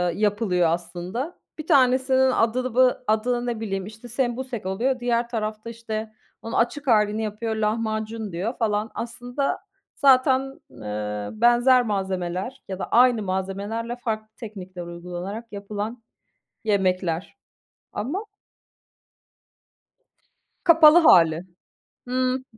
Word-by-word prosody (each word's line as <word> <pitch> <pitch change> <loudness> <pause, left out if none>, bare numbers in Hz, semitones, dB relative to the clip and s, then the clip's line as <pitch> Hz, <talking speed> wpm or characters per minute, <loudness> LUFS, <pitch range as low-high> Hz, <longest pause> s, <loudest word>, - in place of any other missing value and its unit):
yapılıyor 205 -4 +1
aslında. 175 - -4 0.2
Bir 310 - -7
tanesinin 260 -2 +4
adı 250 +1 0
bı 255 0 +4
adı 240 +3 +1
ne 240 -2 -2
bileyim 195 -4 -3
işte 220 +3 -11
sembusek 245 -2 -3
oluyor, 245 +8 0
diğer 240 -1 0
tarafta, 215 -1 -4
işte, 220 -1 -5 0.3
onun 230 - -7
açık 275 +5 0
halini 215 -2 +3
yapıyor, 220 +1 -3
lahmacun 220 0 -2
diyor 185 +8 -2
falan. 215 -1 0
Aslında, 245 +4 -3 0.4
zaten, 270 0 +3
eee, 105 -3 -5
benzer 240 +3 +4
malzemeler 190 +2 -3
ya 190 -1 -5
da - - -2
aynı 240 -2 +5
malzemelerle, 200 +5 -3
farklı 220 -3 -4
teknikler 190 -5 -8
uygulanarak 175 +5 -6
yapılan 210 +3 -5 0.6
yemekler, 185 - 0 0.6
ama 295 - -3 2.4
Kapalı 325 -2 +8
hâli, 165 - +6 0.7
hımm, 255 +1 0
220 Hz, 105 wpm, -24 LUFS, 195-245 Hz, 2.4 s, Kapalı